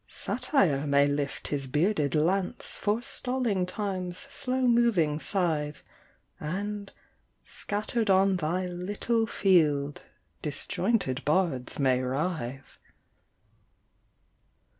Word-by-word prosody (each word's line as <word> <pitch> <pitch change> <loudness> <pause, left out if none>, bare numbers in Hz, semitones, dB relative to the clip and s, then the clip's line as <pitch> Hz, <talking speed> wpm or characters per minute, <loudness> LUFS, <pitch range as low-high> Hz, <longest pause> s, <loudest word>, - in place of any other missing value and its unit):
Satire 195 - +1
may 140 0 +5
lift 145 -1 -2
his 140 -2 -2
bearded 150 +1 +1
lance, 180 +5 0
Forestalling 225 -2 -1
Time's 185 -2 -3
slow 260 -2 0
moving 230 -12 +3
scythe, 160 -6 -1 0.6
And, 200 +5 -4 0.5
scattered 215 +2 -2
on 190 0 +4
thy 180 +3 -1
little 205 +6 -1
field, 150 -9 +2 0.4
Disjointed 150 - -1
bards 150 -5 0
may 130 -2 +2
writhe. 135 -1 -3
180 Hz, 85 wpm, -28 LUFS, 145-205 Hz, 0.6 s, may